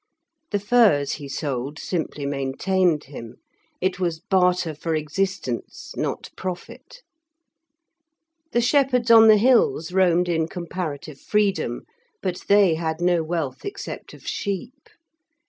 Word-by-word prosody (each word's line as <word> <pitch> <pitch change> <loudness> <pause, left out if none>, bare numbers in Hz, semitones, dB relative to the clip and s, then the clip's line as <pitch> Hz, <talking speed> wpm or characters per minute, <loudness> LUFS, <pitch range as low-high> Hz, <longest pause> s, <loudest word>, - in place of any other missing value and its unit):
The 205 - 0
furs 205 - +3
he 145 -2 -7
sold 140 0 -3
simply 160 -5 -3
maintained 150 +5 0
him; 120 -4 -10 0.4
it 185 0 -1
was 170 -3 -1
barter 180 -2 +1
for 160 +2 -3
existence, 155 -4 -3
not - - -3
profit. 190 - -8 1.5
The 240 - +2
shepherds 250 -2 +2
on 225 -1 +9
the 215 -1 +8
hills 225 -8 +3
roamed 180 -1 +3
in 160 -2 0
comparative 165 -4 -6
freedom, 210 -2 0 0.4
but 180 -1 -3
they 200 -4 +5
had 160 0 -2
no 175 -1 +2
wealth 160 -5 -3
except 400 0 -7
of - - -17
sheep. 235 +8 -4
180 Hz, 120 wpm, -23 LUFS, 155-200 Hz, 1.5 s, on